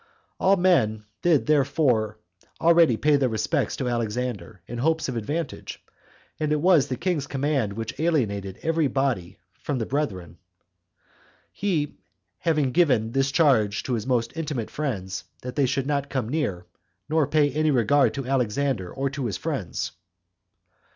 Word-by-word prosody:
All 195 +1 +4
men 130 - +2 0.2
did 165 -5 +3
therefore 135 -7 +2 0.4
already 165 -7 +5
pay 150 +2 +3
their 135 -2 +1
respects 110 -3 0
to 130 - -3
Antipater, 115 -4 -3
in 120 +3 -6
hopes 160 +4 +1
of 130 - -3
advantage; 145 +8 -4 0.6
and 155 -1 0
it 150 - +2
was 165 -4 +4
the 130 - -2
king's 170 -6 -1
command 135 -6 0
which 115 +2 -6
alienated 100 - 0
every 165 -2 +2
body 125 -9 -1 0.2
[from 145 - -2
the 115 - -1
brethren], 105 - -3 1.1
he 165 -8 -1 0.4
having 150 -5 +1
given 125 -9 +3
this 135 +2 +1
charge 125 -10 +3
to 130 - -2
his 115 0 -2
most 120 -1 0
intimate 150 -8 -3
friends, 100 -11 -3 0.2
that 125 0 -6
they 140 -3 +2
should 135 +1 -1
not 140 -1 -1
come 130 -5 -2
near, 110 - -2 0.4
nor 155 -2 +2
pay 145 -1 +3
any 155 +3 +1
regard, 135 +1 +3
to 135 -2 -4
Alexander, 125 -5 0
or 135 +1 -2
to 135 -3 -3
his 100 - -3
friends. - - -3
135 Hz, 150 wpm, -25 LUFS, 115-150 Hz, 1.1 s, already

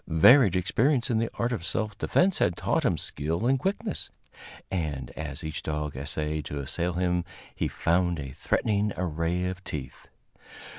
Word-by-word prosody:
Varied 95 - +7
experience 120 - +2
in 110 - +2
the 115 - 0
art 120 +1 0
of 115 -9 -2
self 105 +5 -2
defense 180 - +2
had 85 - +2
taught - - +1
him - - +2
skill 80 +8 -2
and 135 +2 +3
quickness, 200 - -2 0.6
and 75 -9 -2
as 75 +2 -6
each 80 -1 -4
dog 75 -2 -3
essayed 75 +3 -2
to 75 0 -4
assail 85 +6 -2
him 90 0 +1 0.3
he - - -1
found 85 0 +1
a 70 -3 -5
threatening 105 +8 0
array 85 0 -1
of 95 +1 -4
teeth. 70 -7 -6
90 Hz, 160 wpm, -27 LUFS, 75-110 Hz, 0.6 s, Varied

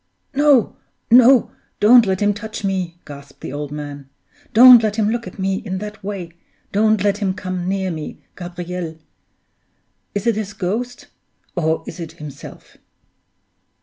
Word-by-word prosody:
"No, 285 -4 +3 0.3
no! 250 +1 +6 0.3
don't 230 +1 +6
let 190 0 -1
him 205 0 +3
touch 220 0 -7
me!" 185 -3 -2
gasped 140 -1 -12
the - - -6
old 145 0 -5
man. 145 -2 -7 0.4
"Don't 245 +1 +9
let 215 -2 -1
him 215 -1 +1
look 235 0 -3
at - - -10
me 190 0 -1
in 195 -4 -5
that 210 +1 -8
way! 190 -4 -5 0.4
Don't 215 0 +2
let 205 0 +1
him 190 -3 -1
come 185 -1 -4
near 190 -1 -1
me, 155 -2 -6 0.2
Gabriel! 175 -2 -6 1.2
Is 205 - -2
it 230 -3 +2
his 205 -2 -4
ghost? 220 +6 -4 0.5
or 160 -2 0
is - - -9
it 165 -2 -7
himself?" 145 -3 -11
195 Hz, 150 wpm, -20 LUFS, 175-220 Hz, 1.2 s, Don't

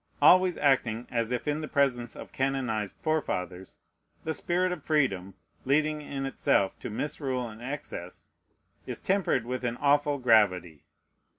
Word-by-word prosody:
Always 185 0 +6
acting 125 -5 +1
as 115 -2 0
if 125 +2 -2
in 150 +1 0
the 155 - -4
presence 125 -5 0
of - - -10
canonized 125 -6 -1
forefathers, 95 - -3 0.5
the 160 - -2
spirit 180 +4 0
of 170 -5 -5
freedom, 100 - 0 0.3
leading 150 +3 +1
in 140 -2 -4
itself 100 -7 +1
to - - -6
misrule 130 +1 -2
and 110 0 -11
excess, 125 -9 -7 0.6
is - - -4
tempered 190 - +1
with 125 +1 -4
an 120 -1 -2
awful 145 0 +2
gravity. 100 - +2
135 Hz, 140 wpm, -28 LUFS, 110-150 Hz, 0.6 s, Always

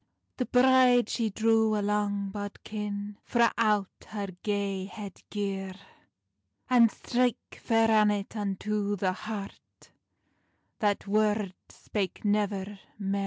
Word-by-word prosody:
The 250 - -1
bride 250 -2 +5
she 230 -2 0
drew 220 +1 +2
a 205 - -1
long 205 -1 0
bodkin 205 0 -5
Frae 235 -1 +3
out 210 -4 0
her 205 -2 -4
gay 200 -2 -1
head 200 -1 -9
gear, 195 -2 -3 0.9
And 240 -3 +6
strake 245 +1 -1
Fair 225 -1 +3
Annet 210 -1 +2
unto 205 0 -1
the 185 -1 0
heart, 205 0 -8 0.9
That 205 -2 +1
word 210 -1 +1 0.2
spak 200 0 -4
nevir 205 -1 0 0.2
mair. 200 -1 -1
210 Hz, 115 wpm, -29 LUFS, 200-220 Hz, 0.9 s, And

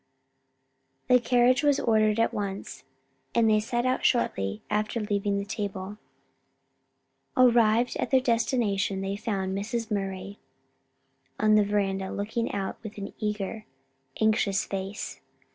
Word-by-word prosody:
The 250 - +7
carriage 245 +1 +3
was 290 -2 +3
ordered 215 -1 +2
at 230 - +2
once, 200 -1 -5 0.5
and 230 -1 +4
they 215 -1 +4
set 240 +3 -1
out 255 0 0
shortly 100 - 0
after 215 +2 -1
leaving 205 -1 -1
the 200 - -2
table. 205 -1 -5 1.4
Arrived 235 -1 +4
at - - -2
their 265 - +5
destination 230 -5 0
they 195 +1 -2
found 195 -3 -2
Mrs. 225 +3 -3
Murray 195 0 -3 1.0
on 215 0 +4
the 210 -1 +6
veranda, 195 -2 -1
looking 220 +3 -2
out 195 -1 -3
with 215 -1 -9
an 200 -1 -6
eager, 210 0 -3 0.5
anxious 215 -3 +2
face. 195 +2 -5
210 Hz, 125 wpm, -27 LUFS, 195-230 Hz, 1.4 s, The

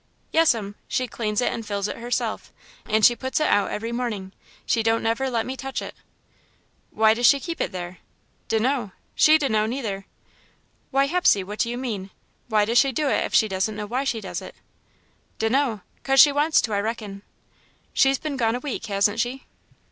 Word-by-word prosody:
"Yes'm. 230 -11 +2
She 255 - -1
cleans 215 -1 -2
it - - 0
and 230 - -5
fills 205 -1 -2
it - - -5
herself, 240 +1 -3 0.4
and 215 -1 +3
she 240 - +6
puts 260 +4 -2
it 305 - +2
out 205 -1 +2
every 230 +2 -4
morning. 225 -6 -3 0.3
She 230 - +1
don't 225 +1 +1
never 230 +4 0
let 230 -3 -1
me 260 - -4
touch 265 0 -4
it." - - -7 1.0
"Why 220 0 +4
does 240 +2 +3
she 280 - +5
keep 335 +4 -5
it - - -1
there?" 180 -1 -7 0.5
"D' 225 - +1
know. 240 -4 -1 0.2
She 310 +1 +6
d' 295 -3 0
know, 215 -3 +1
neither." 220 -6 -4 0.8
"Why, 275 0 +2
Hepsey, 310 - +3
what 210 +3 -8
do 235 - +1
you 240 - -3
mean? 215 -7 -4 0.4
Why 215 -3 +2
does 235 +3 +3
she 275 +1 +3
do 285 +3 0
it - - +1
if - - -3
she 220 - +5
doesn't 195 +2 -1
know 210 0 -4
why 250 +6 -2
she 240 -5 -2
does 195 - -5
it?" - - -10 0.8
"D'know.'Cause 255 +2 0
she 290 - +9
wants 295 +3 +3
to, 220 - -3
I 200 - +1
reckon." 210 -2 -4 0.7
"She's 270 0 +3
been 300 -2 -4
gone 230 -2 +1
a - - -3
week, 250 -4 -5
hasn't 205 +2 +1
she?" 245 +3 -2
230 Hz, 200 wpm, -24 LUFS, 210-265 Hz, 1.0 s, she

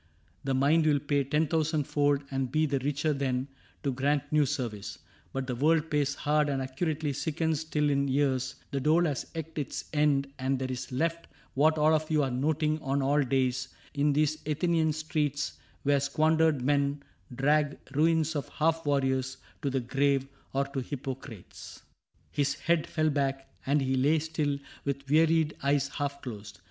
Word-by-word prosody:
The 135 -1 0
mind 155 +4 +3
will 150 -2 +4
pay 145 0 +1
Ten 150 +4 +1
thousand 155 -1 +1
fold 145 0 +1
and 135 -2 -1
be 155 +2 +2
the 140 -2 0
richer 145 +3 0
then 130 -2 -1 0.4
To 140 - +1
grant 140 +3 +1
new 150 -2 +4
service; 120 -8 -4 0.3
but 135 0 -3
the 125 - -3
world 155 +5 +2
pays 145 -1 +1
hard 150 0 +1
And 135 -1 0
accurately 145 +3 -2
sickens 160 +1 -1
till 150 -2 0
in 140 0 +1
years 130 -1 +1 0.2
The 140 - -1
dole 155 +5 +3
has 145 -5 -2
eked 160 -1 -5
its 145 - -4
end 140 -2 +2
and 130 +1 0
there 130 0 -3
is 125 0 -5
left 165 +6 -1 0.3
What 155 +3 +3
all 155 +1 +4
of 155 0 0
you 155 -2 +3
are 135 - -1
noting 155 +4 0
on 135 0 0
all 145 +2 +3
days 130 -1 0 0.3
In 145 0 +2
these 155 +1 +1
Athenian 160 +1 +2
streets, 150 -2 -2 0.2
where 145 0 +3
squandered 155 0 +2
men 140 +1 +1 0.3
Drag 145 +2 +2 0.2
ruins 160 +1 +2
of 145 - -3
half 165 +1 0
warriors 130 -2 +1 0.2
to 140 - 0
the 135 -1 0
grave 135 +2 +1
— - - -34
Or 135 +1 +1
to 140 - -3
Hippocrates." 130 -6 -8 0.5
His 140 -1 0
head 170 -2 +1
fell 155 -2 +1
back, 135 -1 -2
And 140 0 +3
he 130 0 0
lay 145 +5 +3
still 150 -2 -1 0.3
with 140 0 -3
wearied 160 +1 +3
eyes 140 0 +1
half 140 0 -4
closed. 105 -4 -8
145 Hz, 175 wpm, -29 LUFS, 135-155 Hz, 0.5 s, will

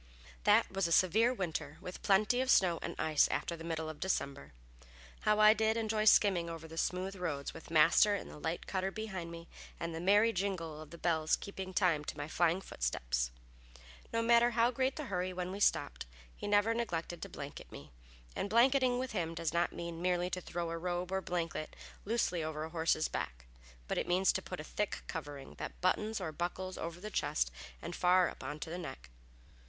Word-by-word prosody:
That - - +5
was 195 -2 0
a - - -4
severe 215 +8 +4
winter, 160 - -3
with 180 - -8
plenty 215 +5 +3
of 260 - -2
snow 175 -8 +4
and - - -4
ice 155 -2 +3
after 170 - -2
the 165 - -9
middle 160 -1 -3
of 155 -1 -7
December. 140 - -2 0.7
How 210 0 +2
I 215 0 +8
did 220 +1 +1
enjoy 215 -1 0
skimming 190 -5 +5
over 165 -1 -7
the 160 - -10
smooth 185 +2 -1
roads, 160 -7 -3
with - - -11
Master 165 +6 +5
in - - -5
the - - -10
light 160 +3 -3
cutter 190 0 -1
behind 195 -5 -5
me, 170 0 -9 0.3
and 170 0 -3
the 165 - -4
merry 205 +6 +4
jingle 175 -6 -2
of 155 - -10
the 170 - -10
bells 160 -2 +2
keeping 190 -1 -7
time 170 -4 +2
to - - -5
my 145 0 -4
flying 175 +3 +2
footsteps. - - -1 0.8
No 230 0 +1
matter 235 +1 +5
how 235 +1 +3
great 260 +2 0
the 300 - -4
hurry 185 -4 -2
when 180 0 -3
we 195 - -5
stopped, - - +1 0.3
he - - -6
never 205 +2 +3
neglected 175 -7 -3
to - - -5
blanket 140 0 -8
me, - - -11 0.4
and 200 - -2
blanketing 250 +2 +4
with 255 0 -3
him 165 -5 -2
does 165 -1 -2
not 170 0 +2
mean 170 -1 -6
merely 180 0 +1
to 180 - -2
throw 170 -1 -4
a 165 - -3
robe 180 +1 -2
or 190 0 0
blanket 170 -3 -3 0.3
loosely 195 -6 0
over 155 0 -3
a 160 - -6
horse's 160 -1 +1
back, - - -5 0.4
but - - 0
it - - -2
means 185 +2 +3
to 190 - -1
put 180 -1 -7
a - - -5
thick 210 +6 -3
covering 145 -4 -7
that - - -6
buttons 215 +4 +1
or 170 -4 -3
buckles 180 +3 -3
over 170 +1 -5
the 210 +3 -7
chest - - 0 0.3
and - - -5
far 180 0 +4
up - - -10
onto 150 +4 -5
the 175 - -4
neck. 70 - -8
180 Hz, 205 wpm, -33 LUFS, 160-205 Hz, 0.8 s, I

